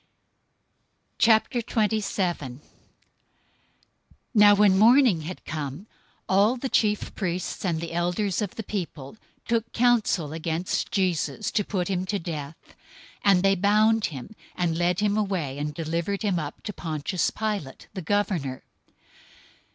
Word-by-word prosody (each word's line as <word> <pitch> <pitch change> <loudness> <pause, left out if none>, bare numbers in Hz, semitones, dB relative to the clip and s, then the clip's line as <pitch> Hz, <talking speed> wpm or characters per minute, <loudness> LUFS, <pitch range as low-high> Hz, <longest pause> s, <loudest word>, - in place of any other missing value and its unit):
027:001 215 - +1 1.7
Now 205 -2 +7
when 200 -2 +5
morning 230 - +5
had 175 +4 -8
come, 145 +3 -5 0.4
all 205 +6 +3
the 265 +2 -3
chief 210 -3 +1
priests 180 -2 -3
and 170 -4 0
the 165 0 -5
elders 180 +4 0
of 205 -3 -3
the 225 - -5
people 170 -8 -5 0.3
took 230 -1 0
counsel 225 -10 +2
against 165 +2 -2
Jesus 190 0 0
to 210 - +1
put 185 -3 -2
him 185 -1 -2
to 205 - 0
death: 160 -4 -5
027:002 - - -21 0.5
and 195 -2 +5
they 195 0 +5
bound 215 +3 +3
him, 145 - -7 0.2
and 175 -2 0
led 175 +2 +1
him 205 -1 +2
away, 175 -10 -2
and 150 +1 -2
delivered 170 +6 -2
him 195 -5 +1
up 145 -3 -7
to 210 - -5
Pontius 160 +1 -2
Pilate, 205 -11 -4
the 190 - -5
governor. 170 -8 -1
190 Hz, 130 wpm, -25 LUFS, 165-210 Hz, 1.7 s, Now